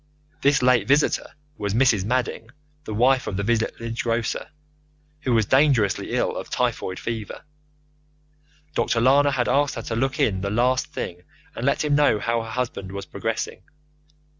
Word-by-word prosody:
This 140 -2 +3
late 125 -5 +4
visitor 145 +3 +1 0.2
was 100 0 -2
Mrs. 115 -6 +3
Madding, 120 -1 -2 0.4
the 110 - -5
wife 130 +3 +3
of 95 - -3
the 100 - -1
village 115 +1 -1
grocer, 115 -1 -2 0.7
who 135 -4 -2
was 110 -3 +3
dangerously 130 - +2
ill - - 0
of - - -6
typhoid 95 -1 -1
fever. 115 -2 -5 1.3
Dr. 115 - +1
Lana 140 +4 +5
had 130 -3 0
asked 145 -1 +2
her - - -5
to 115 - -4
look 135 +3 -1
in 95 -3 +1
the 100 - -2
last 125 +4 +1
thing 90 0 -6 0.3
and 120 - -2
let 140 - +1
him 150 - +1
know 145 -6 +4
how 115 +2 0
her 115 - -7
husband 110 -5 -4
was 100 0 -6
progressing. 110 +4 -4
115 Hz, 165 wpm, -23 LUFS, 110-130 Hz, 1.3 s, Lana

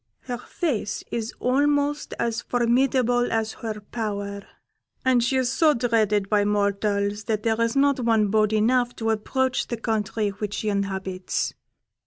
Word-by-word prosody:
Her 245 -2 -5
face 250 - -2
is 230 -1 -2
almost 290 +3 +1
as 230 -1 -1
formidable 245 0 +2
as 220 -1 0
her 220 -2 -4
power, 200 -2 -4 0.6
and 255 -2 +4
she 265 +2 +1
is 255 -1 +1
so 305 +3 +4
dreaded 220 -4 +1
by 205 0 +3
mortals 205 0 0
that 215 -2 -1
there 225 0 +1
is 230 +3 +1
not 280 -1 +3
one 225 -3 +2
bold 215 0 +2
enough 240 +3 +2
to 225 -1 -1
approach 260 +4 0
the 235 - -3
country 220 -1 -1
which 205 +1 -4
she 215 - -2
inhabits. 190 -2 -2
225 Hz, 150 wpm, -24 LUFS, 210-245 Hz, 0.6 s, and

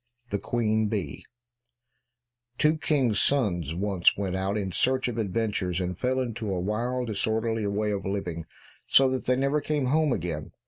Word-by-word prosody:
62 - - -1
The - - -11
Queen 110 -2 +1
Bee 100 -10 -4 1.3
Two 155 +1 +3
kings' 130 -10 +2
sons 90 - +1
once 95 -1 +2
went 95 -2 -2
out 95 +2 -1
in 95 -2 -2
search 130 +8 +1
of 120 -1 -3
adventures, 100 -3 -1
and 90 0 -2
fell 130 +6 0
into 115 -4 -3
a 95 - -1
wild, 120 +6 -1
disorderly 110 0 -1
way 105 +1 0
of 100 -1 -2
living, 90 -5 -3 0.4
so 135 - +6
that 130 - -3
they 125 - +4
never 140 +3 +1
came 150 -3 -1
home 150 +3 +2
again. 80 -7 -3
110 Hz, 170 wpm, -27 LUFS, 95-125 Hz, 1.3 s, so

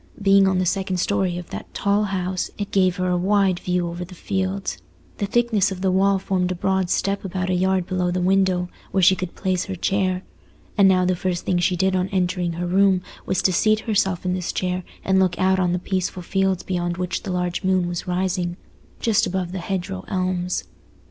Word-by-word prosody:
Being 195 -1 +5
on 190 -1 +2
the 185 - +1
second 190 0 0
story 185 -1 0
of 175 -1 -8
that - - -7
tall 205 +1 +2
house, 185 -2 -2
it 205 -1 -4
gave 185 -2 +3
her 185 0 -1
a 180 - +2
wide 190 0 +2
view 180 -1 -1
over 170 +1 -5
the 180 +1 -11
fields. 190 +2 -2 0.4
The 200 - 0
thickness 220 -3 +2
of 185 -1 -5
the 190 -1 +2
wall 195 +1 +3
formed 185 -1 -1
a - - -1
broad 190 0 0
step 200 +2 0
about 185 -1 -2
a - - +2
yard 185 0 +1
below 180 -1 -1
the 180 +1 -1
window, 185 -1 +2 0.2
where 190 - +1
she 190 +2 +7
could 185 -2 -5
place 185 -2 -1
her 195 - -4
chair. 185 0 0 0.5
And 200 -2 +6
now 185 -1 +4
the 185 0 +2
first 180 -1 -2
thing 180 -2 +1
she 180 +1 +2
did 190 +1 +1
on 185 +1 0
entering 180 -2 0
her 175 +2 -3
room 190 0 +3 0.2
was 185 - 0
to 185 - +3
seat 215 +4 +3
herself 190 -5 0
in 180 - +1
this 180 -1 -2
chair 180 0 -1 0.2
and 190 0 +3
look 185 -2 +2
out 190 0 +2
on 180 -2 +2
the 180 - +1
peaceful 185 0 -2
fields 190 0 0
beyond 175 -2 -2
which 180 0 -2
the 195 - -5
large 180 -1 -2
moon 185 -1 +2
was 175 0 -4
rising, 180 -1 -1 0.4
just 225 -3 +2
above 180 -1 -2
the 190 - -4
hedgerow 175 - -3
elms. 185 - -1
185 Hz, 215 wpm, -22 LUFS, 180-190 Hz, 0.5 s, she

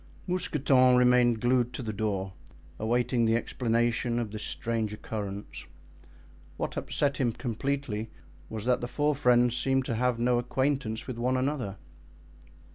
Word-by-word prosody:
Mousqueton 135 -8 +3
remained 125 -2 +4
glued 125 0 +2
to 130 - -5
the 110 -2 -3
door, 100 -2 -2 0.5
awaiting 120 +2 +1
the 115 0 +3
explanation 120 0 0
of 115 -3 -2
this 110 0 -6
strange 110 -2 -2
occurrence. 105 -2 -6 0.9
What - - -3
upset 140 -2 0
him 120 -4 +1
completely 120 -2 -3 0.4
was 110 -1 -5
that 125 0 +2
the 120 - -3
four 150 +3 +1
friends 125 -3 +3
seemed 135 +1 +1
to 115 - -2
have 125 +1 +1
no 120 +1 +2
acquaintance 125 -2 -1
with 125 -3 -6
one 130 +2 +1
another. 130 -7 -2
120 Hz, 140 wpm, -28 LUFS, 110-130 Hz, 0.9 s, remained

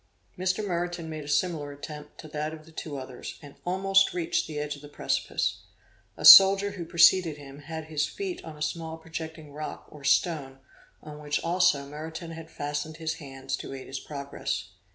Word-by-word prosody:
Mr. 185 +3 -1
Meriton 175 -2 -2
made 155 -1 -5
a - - -11
similar 150 -2 0
attempt 150 +1 -9
to 155 - -10
that 150 +1 -3
of 155 -1 -14
the 165 - -16
two 155 -2 -6
others, 130 -1 -8
and 145 -1 -12
almost 195 +1 +3
reached 170 -2 0
the 155 -2 -6
edge 150 0 -2
of 145 - -13
the 145 - -10
precipice. - - -1 0.6
A - - -4
soldier 195 +1 +10
who 180 -4 -6
preceded 170 -2 +5
him 140 -1 -11
had 160 +1 -6
his 155 -1 -1
feet 385 -3 -5
on 160 -2 -9
a 150 - -3
small 160 +1 -3
projecting 160 -2 -8
rock 150 +1 -6
or 150 -2 -12
stone 140 -4 +1 0.5
on 150 -1 -9
which 150 0 -2
also 165 -5 +3
Meriton 160 +3 -7
had 165 0 -9
fastened 145 +1 -4
his 160 0 -3
hands 135 -2 -5
to - - -7
aid 130 - -8
his 135 - -5
progress. 140 -1 -4
155 Hz, 190 wpm, -28 LUFS, 145-170 Hz, 0.6 s, soldier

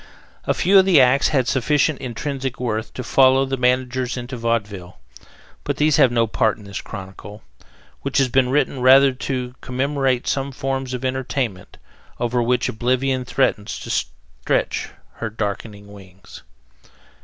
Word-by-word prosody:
A - - +1
few 195 +2 +5
of 190 - +4
the 180 -6 +5
acts 135 +3 +4
had 130 -4 +1
sufficient 145 +2 +1
intrinsic 135 +1 -4
worth 110 -3 -3
to 125 - -5
follow 130 +2 +4
the 135 0 -2
managers 125 -1 0
into 125 +1 -6
vaudeville, 105 -6 -3 0.7
but - - -3
these 150 -1 +3
have 125 - +5
no 115 -1 +2
part 110 -1 0
in 105 - -14
this 100 0 -6
chronicle, 100 +1 -10 0.6
which 140 - -2
has 135 -2 +4
been 125 0 +2
written 135 -1 0
rather 135 +2 +6
to 125 -1 -4
commemorate 135 -1 -1
some 135 0 -1
forms 135 -1 -3
of 125 +1 -5
entertainment 130 -6 -3 0.4
over 120 0 0
which 125 +1 +1
oblivion 130 +3 -1
threatens 115 -5 0
to - - -7
stretch - - -2 0.3
her 110 - -4
darkening 105 -1 -5
wings. 95 -1 -14
125 Hz, 150 wpm, -21 LUFS, 115-135 Hz, 0.7 s, rather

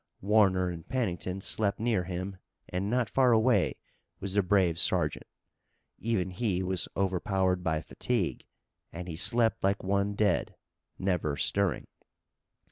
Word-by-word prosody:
Warner 95 -3 +3
and 85 -2 -9
Pennington 95 -6 -2
slept 100 0 0
near 110 -5 0
him 95 +2 -5 0.3
and 95 +3 -2
not 125 0 +1
far 130 +1 +3
away 110 -3 +3 0.4
was 95 -1 -4
the 100 - +4
brave 90 -3 +2
sergeant. 85 -6 +1 0.7
Even 100 -5 -1
he 95 -1 -1
was 95 -2 -1
overpowered 95 -1 0
by 80 -3 0
fatigue 105 +4 -2 0.4
and 85 +2 -7
he 85 - -5
slept 115 +5 +2
like 100 +1 +1
one 100 +1 0
dead, 105 0 +1 0.4
never 90 -6 -1
stirring. 100 -1 +1
95 Hz, 130 wpm, -29 LUFS, 90-105 Hz, 0.7 s, the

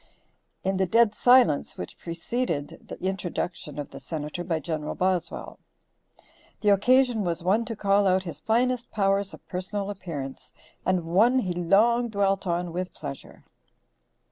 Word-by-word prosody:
in 190 0 0
the 190 0 +1
dead 225 +2 +4
silence 245 - +4
which 90 - -7
preceded 170 - -3
the - - -8
introduction 180 -5 -3
of 145 - -5
the 135 - -9
Senator 155 +3 -5
by 165 -2 -1
Gen. 155 -2 -3
Boswell. 185 -2 -2 1.0
The 210 - +3
occasion 245 +2 +4
was 170 -2 -2
one 205 +6 +2
to 225 - -5
call 200 -1 +3
out 185 0 +3
his 165 -5 -7
finest 240 +5 +1
powers 195 -1 +1
of - - -23
personal 195 +2 -3
appearance, 150 -9 -7 0.3
and 185 -2 +1
one 215 +10 +4
he 185 -8 0
long 220 +8 +3
dwelt 195 -2 0
on 175 0 -1
with 180 +1 -3
pleasure. 140 -3 -8
190 Hz, 145 wpm, -26 LUFS, 170-215 Hz, 1.0 s, dead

